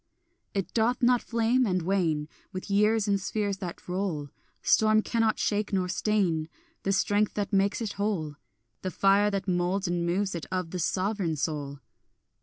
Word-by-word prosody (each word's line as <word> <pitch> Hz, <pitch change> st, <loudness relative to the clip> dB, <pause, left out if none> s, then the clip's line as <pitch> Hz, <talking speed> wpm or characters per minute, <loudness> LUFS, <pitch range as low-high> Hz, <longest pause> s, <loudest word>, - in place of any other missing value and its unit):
It 195 Hz, -4 st, -2 dB
doth 235 Hz, +2 st, +1 dB
not 245 Hz, 0 st, +4 dB
flame 235 Hz, +2 st, +1 dB
and 185 Hz, -3 st, 0 dB
wane 165 Hz, -5 st, 0 dB, 0.2 s
With 185 Hz, +1 st, -6 dB
years 210 Hz, +1 st, +3 dB
and 200 Hz, -1 st, +1 dB
spheres 205 Hz, -1 st, -1 dB
that 180 Hz, -3 st, -7 dB
roll, 180 Hz, -6 st, -2 dB, 0.3 s
Storm 215 Hz, 0 st, +4 dB
cannot 225 Hz, -2 st, +1 dB
shake 210 Hz, 0 st, 0 dB
nor 185 Hz, -2 st, +1 dB
stain 180 Hz, -5 st, 0 dB, 0.3 s
The 195 Hz, -, 0 dB
strength 205 Hz, +2 st, +1 dB
that 205 Hz, 0 st, -2 dB
makes 200 Hz, +3 st, +2 dB
it 215 Hz, -3 st, -3 dB
whole, 180 Hz, -8 st, -2 dB, 0.4 s
The 185 Hz, -, -2 dB
fire 200 Hz, +2 st, +3 dB
that 200 Hz, -1 st, -3 dB
moulds 180 Hz, +2 st, 0 dB
and 175 Hz, 0 st, 0 dB
moves 190 Hz, +3 st, 0 dB
it 170 Hz, -, -5 dB
of 185 Hz, -3 st, -2 dB
the 180 Hz, -, -3 dB
sovereign 185 Hz, -1 st, 0 dB
soul. 145 Hz, -2 st, -3 dB
195 Hz, 165 wpm, -28 LUFS, 175-210 Hz, 0.4 s, not